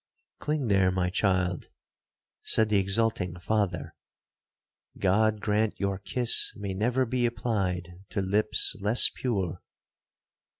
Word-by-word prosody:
'Cling 150 -2 -2
there, 95 -3 +3
my 90 -1 -1
child,' 90 -3 0 0.7
said 110 -1 +1
the 105 -2 +3
exulting 95 -3 -1
father.—'God 105 +1 -3
grant 105 +1 -1
your 100 -1 -2
kiss 120 +4 +3
may 100 -1 -5
never 120 +7 0
be 125 0 0
applied 95 -7 -2 0.2
to 105 - -3
lips 105 +3 +1
less 105 +4 +5
pure.' 95 -10 -3
105 Hz, 110 wpm, -27 LUFS, 95-110 Hz, 0.7 s, less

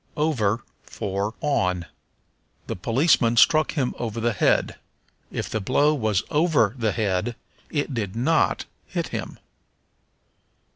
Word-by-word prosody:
Over 120 -8 +1 0.2
for 100 +3 -3
On. 90 -12 0 0.8
"The - - -4
policeman 120 - +2
struck 155 +6 +5
him 135 -6 0
over 115 -1 -3
the 115 0 +1
head." 100 - +1 0.5
If - - -3
the 110 - -2
blow 145 +8 +3
was 110 -8 0
over 150 - +3
the 110 -4 0
head 105 +2 -1 0.3
it 145 -2 -2
did 105 -5 -3
not 145 +7 +2 0.2
hit - - -3
him. - - -5
115 Hz, 125 wpm, -24 LUFS, 105-145 Hz, 0.8 s, struck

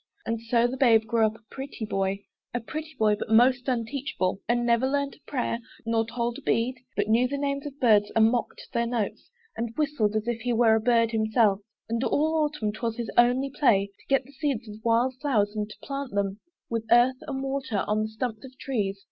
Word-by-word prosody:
And 230 0 -2
so 230 +1 +2
the 250 +2 -1
babe 230 -4 +5
grew 225 -1 +3
up 215 - -5
a 225 - -19
pretty 270 -4 -6
boy, 195 -1 -2 0.3
A - - +1
pretty 305 +5 -7
boy, 210 -1 +3
but - - -5
most 245 +3 +4
unteachable 235 -6 -2
And 240 0 +2
never 235 +2 +3
learnt 280 0 -1
a - - -29
prayer, 245 -4 -1 0.3
nor 225 0 +1
told 235 0 -2
a - - -15
bead, 250 +2 0 0.2
But 205 0 0
knew 230 +3 +3
the 280 +2 -3
names 280 0 -2
of 285 0 -10
birds, 210 -4 +4
and 225 0 +5
mocked 245 -2 -3
their 235 0 +1
notes, 230 -4 -3 0.3
And 230 0 -4
whistled, 275 -9 +1
as 215 0 0
he 240 +1 -1
were 225 -1 +4
a 220 - +4
bird 230 -1 +3
himself: 220 -2 +2 0.3
And 230 +2 -1
all 305 +4 +2
the 320 - +1 0.2
autumn 215 -5 -1
'twas 230 +1 -3
his 235 -2 -4
only 250 +3 +3
play 200 -9 +2
To - - -23
get 275 -1 +2
the 270 - -17
seeds 275 -5 -2
of 215 +1 -10
wild 235 +3 +2
flowers, 210 -8 +1
and 210 0 -2
to - - -10
plant 275 -5 -5
them 200 0 -1 0.3
With 230 -1 -3
earth 245 +2 +5
and 270 -1 -3
water, 270 -6 -2
on 210 +1 +1
the 215 - -2
stumps 220 0 -4
of 260 -1 -12
trees. 205 -9 -2
235 Hz, 220 wpm, -26 LUFS, 220-260 Hz, 0.3 s, babe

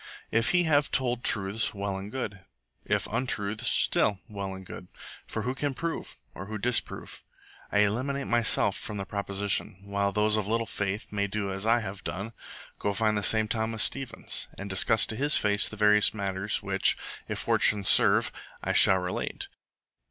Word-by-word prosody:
If 115 +1 +2
he 180 0 +3
have 150 -3 +2
told 125 -2 -1
truths, 100 +2 +2
well 100 0 -3
and 95 +2 -7
good; 105 -6 -5 0.5
if - - 0
untruths, 110 -3 -2
still 105 -2 +2
well 100 -2 -6
and 95 0 -11
good. 90 - -10 0.4
For 110 - -4
who 125 +2 -2
can 140 0 -2
prove? 165 +4 -5 0.2
or 95 - -8
who 110 0 -5
disprove? 120 +3 -1 0.5
I 105 - +3
eliminate 130 +7 -1
myself 115 -4 +3
from 105 - -6
the 100 - -4
proposition, 100 -1 -1
while 100 0 -1
those 105 +1 +2
of 105 -2 -2
little 115 +1 0
faith 100 0 -4
may 100 -1 -1
do 100 -1 -3
as 95 +3 -3
I 115 +1 +3
have 95 -2 -7
done 100 +5 -5 0.5
go 100 - -1
find 110 +1 +1
the 105 - 0
same 110 +1 +3
Thomas 110 -1 0
Stevens, 135 -3 0
and 100 - -6
discuss 110 +3 +4
to 110 - -4
his 145 +5 +3
face 105 0 +1
the 110 - -9
various 105 0 +4
matters 100 0 -1
which, 95 -1 +2 0.3
if - - -4
fortune 105 -2 +2
serve, - - +4 0.3
I - - -1
shall 95 - +7
relate. 90 0 -4
105 Hz, 175 wpm, -27 LUFS, 100-115 Hz, 0.5 s, shall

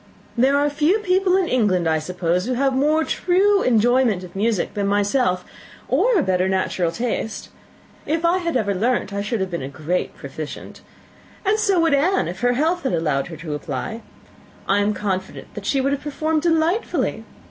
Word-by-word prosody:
There 265 +4 +3
are 290 +1 +2
few 300 +7 +2
people 375 -2 +2
in 375 -2 +1
England, 200 - +1
I 160 -1 +2
suppose, 180 +2 -1
who 255 - -1
have 270 +2 +1
more 300 +4 +2
true 390 +5 +2
enjoyment 235 -3 +2
of 180 - -11
music 210 -1 0
than 200 -2 -1
myself, 205 -2 +1 0.4
or - - +3
a 320 - +2
better 185 -2 +1
natural 185 -2 0
taste. 225 +1 -3 0.6
If 320 +3 0
I 350 +2 +3
had 335 -6 -1
ever 205 -4 0
learnt, 215 0 0
I 200 - -2
should 210 +1 -2
have 190 -1 -2
been 170 - -3
a 130 - -5
great 155 +6 -3
proficient. 145 +2 -8 0.6
And 420 +3 +2
so 400 -4 +2
would 330 -2 +3
Anne, 345 +8 +2
if 180 +2 -6
her 245 0 +2
health 325 +7 +1
had 265 - -1
allowed 150 -5 0
her 165 -2 -8
to 155 -1 -6
apply. 150 - -5 0.7
I 200 +1 +3
am 205 +1 +1
confident 190 -2 -4
that 200 -1 -7
she 275 - +2
would 275 +1 0
have 280 - -1
performed 310 +2 -1
delightfully. 335 +5 0
235 Hz, 190 wpm, -21 LUFS, -, 0.7 s, There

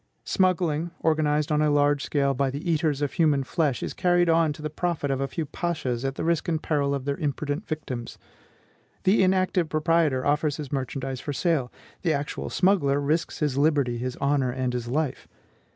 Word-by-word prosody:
Smuggling, 175 -4 +1
organized 150 -2 +1
on 150 0 +2
a 150 - +3
large 145 0 +2
scale 140 -2 +1
by 135 +1 0
the 145 +6 -3
eaters 150 -3 +1
of 145 - -1
human 150 -5 +2
flesh, 140 -2 0
is - - -3
carried 175 -2 +2
on 165 -1 +3
to 150 - -11
the 155 - -2
profit 160 -3 -1
of 135 0 -1
a 135 - 0
few 155 +4 -3
pashas 145 -6 -3
at 135 0 -2
the - - -4
risk 165 -1 0
and 160 -2 -1
peril 140 -2 +1
of 135 -1 -5
their 140 0 -1
imprudent 145 +4 -3
victims. 130 -7 -5 0.9
The 195 +3 +4
inactive 185 -3 +2
proprietor 155 -4 +2
offers 150 0 +1
his 150 -4 -6
merchandise 135 -1 -3
for 145 - -4
sale; 145 -5 0 0.3
the 165 -3 +1
actual 145 0 -3
smuggler 175 -8 +2
risks 150 +4 -1
his 140 -3 +1
liberty, 140 -5 +2
his 125 +1 -3
honor, 140 -2 +1
and 125 0 -2
his 120 -1 -3
life. 145 +2 -2
150 Hz, 190 wpm, -26 LUFS, 140-165 Hz, 0.9 s, The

